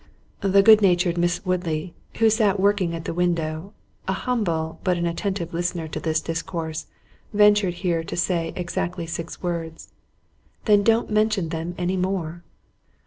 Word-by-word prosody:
The 195 0 +4
good 215 0 +8
natured 175 -3 +3
Miss 175 +3 0
Woodley, 175 -2 -2 0.2
who 225 -1 +4
sat 210 -3 +2
working 195 -4 +2
at 165 - -7
the - - -3
window, 170 0 -1 0.4
an 190 - 0
humble, 170 -10 -1
but 180 -2 +1
an 170 - -1
attentive 170 0 -2
listener 175 -1 -2
to - - -4
this 160 -1 0
discourse, 165 -1 -4 0.5
ventured 205 -3 +5
here 175 -3 -1
to - - -5
say 170 -2 0
exactly 175 -1 -3
six 165 +2 -6
words: 165 -2 -4 0.7
"Then 210 -2 +5
don't 225 +2 +2
mention 215 -5 +1
them 165 +2 -4
any 180 +1 -1
more." 180 -3 -2
175 Hz, 150 wpm, -24 LUFS, 165-195 Hz, 0.7 s, good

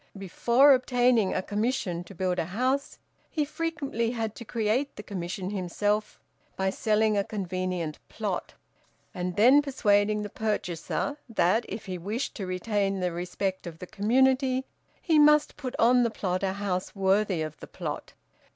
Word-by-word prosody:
Before 235 +9 +4
obtaining 245 -4 +3
a 185 - 0
commission 205 -5 -1
to 195 - -12
build 180 0 -1
a - - 0
house, 255 - -1 0.3
he 305 -3 0
frequently 285 -7 -2
had 225 -3 -3
to - - -7
create 235 +5 -1
the 210 - -8
commission 185 -1 -4
himself 205 +2 -1 0.4
by 190 0 0
selling 215 +1 +2
a 200 - +2
convenient 185 -5 -3
plot, - - -4 0.6
and 180 0 -3
then 255 +7 +6
persuading 210 -6 +2
the 205 - -5
purchaser 215 - -2
that 220 +1 +2
if 210 +3 -6
he 185 -3 -5
wished 215 +9 -3
to 195 - -4
retain 195 +1 -1
the 180 -1 0
respect 180 +2 -3
of 165 -2 -8
the 180 - -8
community 260 +6 +2 0.3
he 320 -3 +3
must 300 0 +5
put 255 -3 -5
on 245 +2 +5
the 235 - +2
plot 185 -4 -2
a 190 -1 0
house 195 -2 -3
worthy 195 -3 +2
of 155 -1 -6
the - - -9
plot. - - -6
210 Hz, 160 wpm, -27 LUFS, 185-245 Hz, 0.6 s, then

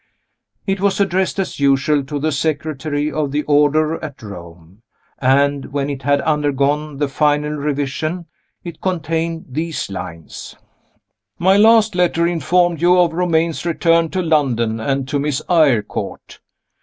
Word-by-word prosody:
It 195 -1 -1
was 200 -1 +1
addressed 190 -1 0
as 195 -6 -3
usual 140 +1 +2
to 145 +1 -4
the 155 +2 -1
Secretary 150 0 -2
of 150 -2 -2
the 150 +1 -1
Order 150 +2 +2
at 145 -5 -8
Rome; 85 -1 -12 0.4
and, 140 +1 +2
when 140 0 -3
it 135 -1 -6
had 140 +1 +1
undergone 150 -1 0
the 145 0 0
final 150 +1 +1
revision, 150 +3 -3 0.4
it 170 -3 -9
contained 165 -2 -2
these 155 -3 -4
lines: 85 -4 -8 0.8
My 190 +2 +3
last 220 +1 +5
letter 175 -2 +1
informed 175 0 +1
you 180 +1 +4
of 170 -2 +3
Romayne's 165 -2 0
return 165 -1 +2
to 185 +1 -2
London 125 -9 +1
and 135 +3 -2
to 140 +1 -1
Miss 145 -1 -1
Eyrecourt. 145 - 0
150 Hz, 140 wpm, -18 LUFS, 140-170 Hz, 0.8 s, last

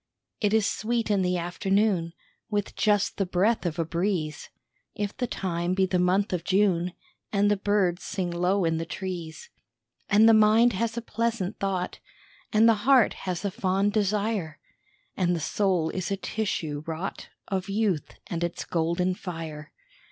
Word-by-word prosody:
It 205 -2 +1
is 220 -1 +3
sweet 230 0 -1
in 200 -2 +3
the 180 0 +1
afternoon, 185 0 0 0.4
With 205 -2 -2
just 205 -1 +2
the 195 - +1
breath 190 +3 +1
of 155 - -4
a 165 - 0
breeze, 165 -3 -2 0.5
If 205 -1 -3
the 250 -2 -2
time 175 -3 -2
be 190 0 +3
the 185 -1 0
month 185 +3 +2
of 175 -2 -1
June 180 -2 +2 0.4
And 205 0 +3
the - - +4
birds 195 -3 +1
sing 185 -4 -3
low 180 +2 +1
in 165 0 +1
the 165 - -3
trees. 180 - -6 0.6
And 215 +2 +6
the 225 - +7
mind 220 +2 +5
has 230 +4 -2
a 235 - -3
pleasant 230 -4 -2
thought, 190 -2 -2 0.5
And 220 +1 +5
the 230 - +7 0.2
heart 260 -5 +6 0.2
has 180 +2 -3
a 200 - 0
fond 195 +2 0
desire, 205 -5 0 0.6
And 180 -2 +1
the - - -2
soul 175 0 0
is 185 -2 -3
a 195 - -1
tissue 170 -8 -3
wrought 165 +4 -5 0.2
Of 195 0 -2
youth, 195 -6 -1
and 170 -1 -3
it's 170 0 -3
golden 170 +2 0
fire. 165 -4 -7
190 Hz, 165 wpm, -26 LUFS, 175-210 Hz, 0.6 s, the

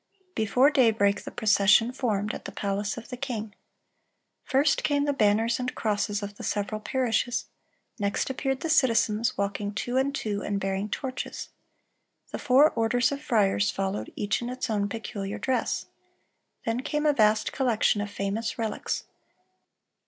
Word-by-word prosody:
Before 250 - +3
daybreak 220 -7 +3
the - - -4
procession 215 +1 +4
formed, 215 -5 -1
at - - -8
the - - -5
palace 200 +1 -2
of 235 - -9
the 250 - -6
king. 230 -5 -4 0.9
"First 280 +2 +2
came 285 -1 +2
the 285 - +1
banners 225 0 +2
and 250 0 -3
crosses 205 -1 -1
of 205 0 -7
the - - -8
several 210 +1 -2
parishes; 245 -1 0 0.5
next 200 -1 0
appeared 270 0 -2
the - - -2
citizens, 230 -5 +2
walking 200 +1 -2
two 245 +4 -2
and 275 +2 +1
two, 205 -6 -2
and 200 -1 -2
bearing 195 +2 -2
torches." 260 +3 -5 0.8
The - - -4
four 285 +3 +5
orders 235 +2 +1
of 280 0 -4
friars 210 -7 +2
followed, 195 +1 -3
each 205 +2 -1
in 240 - -4
its 250 -2 -3
own 205 -1 0
peculiar 200 -2 -5
dress. 255 -3 -1 0.8
Then 230 +1 0
came 300 +3 -2
a 300 - +5
vast 215 -3 +3
collection 235 -5 +2
of 205 - -4
famous 205 +3 -3
relics. 225 -2 -2
225 Hz, 155 wpm, -27 LUFS, 205-255 Hz, 0.9 s, four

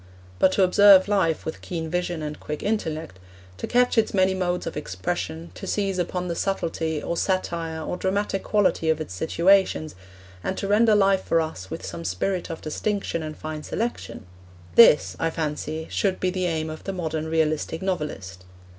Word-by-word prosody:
But 190 - +5
to 195 - +3
observe 195 +1 +7
life 195 -6 +1
with 160 - -5
keen 165 -2 -4
vision 175 -1 -2
and 150 0 -5
quick 150 0 -5
intellect, 160 - -2 0.4
to - - -4
catch 245 -1 +3
its 220 - 0
many 190 0 +3
modes 180 -1 -1
of 165 - -5
expression, 90 - -4
to - - -8
seize 195 -3 -1
upon 180 +1 -2
the 170 - -1
subtlety, 165 -4 -2
or 170 - -2
satire, 170 -3 -1
or 180 - -3
dramatic 195 +1 -1
quality 195 -6 +1
of 160 -1 +2
its 155 -12 -6
situations, 170 - +2 0.5
and 190 - -2
to 195 - -3
render 215 +2 +4
life 195 -1 +3
for 165 - +2
us 155 - -4
with - - -6
some 85 0 -6
spirit 170 - -2
of 165 - -6
distinction 195 +2 -2
and 155 -1 -6
fine 155 -1 -5
selection 215 - -4 0.5
this, 230 -10 +6
I 165 - +1
fancy, 155 0 -3
should 190 -2 0
be 185 - 0
the 185 -1 -1
aim 160 -2 -2
of 155 - -9
the 195 - -3
modern 160 -3 -3
realistic 160 +1 0
novelist. 150 - -4
170 Hz, 180 wpm, -24 LUFS, 155-190 Hz, 0.5 s, observe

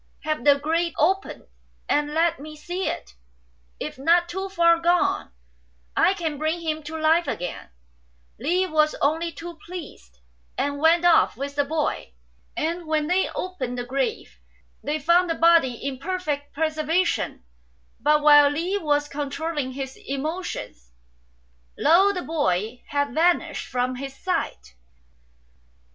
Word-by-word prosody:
Have 305 -1 -2
the 285 -1 +6
grave 330 +4 -1
opened, 380 +6 0 0.4
and 295 0 +1
let 335 +1 +2
me 305 +2 -9
see 355 +5 -4
it; 60 - -5 0.7
if - - -6
not 340 +5 +3
too 380 +3 -4
far 335 -3 +4
gone, 345 +1 +1 0.6
I 385 - +4
can 320 -6 -3
bring 315 +3 -1
him 315 -1 -2
to 320 +1 -5
life 320 +1 +3
again," 180 - -5 0.7
Li 350 +9 +1
was 310 -3 +2
only 325 +4 +1
too 335 +1 -9
pleased, 300 - -10 0.4
and 285 0 -1
went 330 +3 +4
off 345 -8 +4
with 280 +2 -4
the 285 0 +1
boy; 305 +1 -2 0.4
and 335 +2 -2
when 310 -1 +1
they 360 +4 +1
opened 265 -10 -4
the 245 - -3
grave 275 - -3 0.4
they 295 +2 -1
found 340 +4 +3
the 330 - 0
body 330 -6 +4
in 265 +2 -5
perfect 300 -4 -3
preservation; 315 - 0 0.6
but 300 +4 +3
while 290 -1 +8
Li 345 +7 -1
was 290 -3 +1
controlling 290 -1 -3
his 265 0 -6
emotions, 275 - -5 0.9
lo! 385 +5 +5
the 360 -3 -4
boy 245 - -1
had 285 0 -1
vanished 340 0 +1
from 250 0 -1
his 270 0 -7
sight. 65 - -3
310 Hz, 140 wpm, -24 LUFS, 280-340 Hz, 0.9 s, while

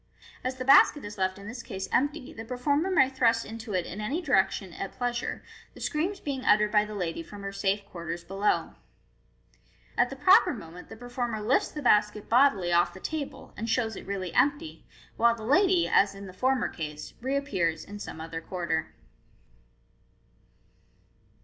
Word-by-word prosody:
As 255 0 -2
the 255 0 -5
basket 275 0 +6
is 205 -1 -8
left 185 0 0
in 200 +1 -10
this 240 +2 -6
case 190 -4 -6
empty, 285 +1 0
the 225 - -7
performer 285 +8 0
may 305 -8 +5
thrust 235 -4 +2
into 220 -2 -6
it 180 -2 0
in 200 +4 -6
any 275 +10 -1
direction 195 - +1
at 195 - -6
pleasure, 245 -1 -3 0.3
the - - -12
screams 360 +6 -1
being 270 -3 -4
uttered 210 0 +4
by 210 -1 +4
the 215 0 -7
lady 170 -4 -3
from 200 +4 -10
her 195 - -4
safe 200 0 -1
quarters 170 -1 -6
below. 195 +3 0 1.2
At - - +3
the - - -6
proper 375 -5 +5
moment 175 -4 -11
the - - -10
performer 245 -1 -3
lifts 220 +5 +2
the 295 - -7
basket 210 -2 +2
bodily 225 -8 +4
off 175 0 +3
the - - -9
table, 300 +5 -5
and 225 +2 -4
shows 225 -2 0
it - - -9
really 190 -3 -4
empty, 290 +3 0 0.3
while 235 0 +4
the 225 - -10
lady, 360 - +3
as 200 0 +3
in 200 0 -9
the 185 - -10
former 255 +5 +1
case, 150 -2 -7
reappears 250 - -1
in 205 0 -9
some 160 - -7
other 165 0 -6
quarter. 165 -3 -3
215 Hz, 175 wpm, -28 LUFS, 190-260 Hz, 1.2 s, basket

